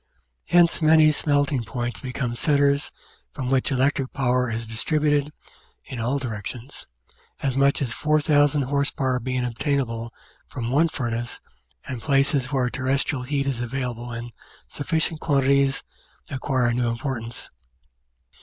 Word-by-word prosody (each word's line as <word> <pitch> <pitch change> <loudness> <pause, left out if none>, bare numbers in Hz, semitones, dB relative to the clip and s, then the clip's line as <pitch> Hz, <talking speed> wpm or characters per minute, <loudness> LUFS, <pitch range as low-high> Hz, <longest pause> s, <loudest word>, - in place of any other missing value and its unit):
Hence 170 -1 +4
many 155 0 +6
smelting 145 -3 +1
plants 120 -2 -4
become 125 -1 -3
centres 140 +2 +2 0.4
from 130 -2 -3
which 135 +1 +2
electric 135 0 +1
power 125 -1 +1
is 115 0 -3
distributed 145 +5 0 0.5
in 130 - -7
all 125 +5 0
directions 125 +1 -6 0.6
as 135 -2 0
much 140 +1 +3
as 120 -3 -3
4,000 145 -1 +3
h.p. 140 +1 -1 0.2
being 130 +1 -1
obtainable 120 -2 -2 0.4
from 120 -2 -4
one 155 +5 +4
furnace 120 -5 -3 0.5
and 125 -3 -5
places 140 0 +2
where 130 -3 +1
terrestrial 135 0 0
heat 140 +1 -1
is 135 -3 -1
available 120 -1 -4
in 120 +1 -6 0.4
sufficient 160 +2 -1
quantities 140 -2 +2 0.5
acquire 130 -2 0
a - - +1
new 120 0 0
importance. 115 -1 -5
135 Hz, 125 wpm, -24 LUFS, 120-145 Hz, 0.6 s, many